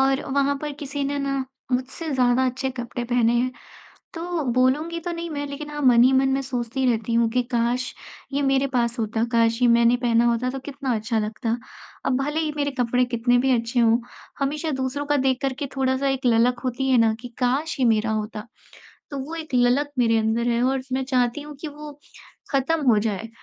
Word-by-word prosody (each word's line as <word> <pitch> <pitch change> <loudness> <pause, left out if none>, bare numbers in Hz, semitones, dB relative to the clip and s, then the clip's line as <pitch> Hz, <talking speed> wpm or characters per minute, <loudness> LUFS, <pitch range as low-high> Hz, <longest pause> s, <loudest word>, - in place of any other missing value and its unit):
और 270 +1 +2
वहाँ 280 0 +2
पर 295 - -3
किसी 285 0 -3
ने 285 +1 -1
ना 275 -1 -1 0.3
मुझसे 260 +6 -2
ज़्यादा 250 0 +3
अच्छे 260 +1 -2
कपड़े 245 -1 -5
पहने 240 -1 +2
हैं 255 +2 +1 0.6
तो 335 -1 -3
बोलूँगी 295 +7 +1
तो 345 +1 -4
नहीं 335 0 -5
मैं, 290 -2 -3
लेकिन 290 +1 -7
हाँ 295 0 -5
मन 245 -3 +6
ही 260 - +5
मन 265 0 +3
मैं 270 +1 +1
सोचती 255 0 -2
रहती 230 0 -1
हूँ 230 0 +3
कि 250 +2 +1
काश! 240 +2 0 0.4
ये 285 - +1
मेरे 270 0 +2
पास 240 -2 0
होता, 225 +1 -1
काश! 230 +1 +2
ये 245 - +5
मैंने 235 +1 +5
पहना 240 -1 +2
होता 240 +1 +1
तो 270 +1 -4
कितना 270 -2 -3
अच्छा 220 +1 -1
लगता। 225 +2 -2 0.5
अब 255 - +2
भले 295 +3 -1
ही 310 -1 -1
मेरे 285 -1 0
कपड़े 245 +1 +2
कितने 245 0 +1
भी 265 +1 +2
अच्छे 230 +2 -1
हों, 230 -1 +5 0.4
हमेशा 300 +3 -1
दूसरों 265 +2 -2
का 290 0 +1
देख 260 -1 +2
कर 270 -1 0
के 285 - -2
थोड़ा-सा 265 +1 +1
एक 265 -1 -2
ललक 240 +1 +3
होती 265 +2 -1
है 255 - +5
ना 225 -1 +4
कि 245 - -6
काश! 270 +5 0
ये 255 - +3
मेरा 220 -1 +2
होता, 215 +1 -4 0.6
तो 280 - -4
वो 295 +5 -5
एक 315 -4 -6
ललक 250 +4 +3
मेरे 230 -2 +3
अंदर 225 +2 0
है 235 0 +1
और 265 +1 +1
मैं 265 0 0
चाहती 255 0 +1
हूँ 295 0 -9
कि 310 - -4
वो 295 0 -9 0.6
ख़त्म 275 +4 +1
हो 215 - +4
जाए, 215 0 -2
255 Hz, 215 wpm, -23 LUFS, 235-280 Hz, 0.6 s, मन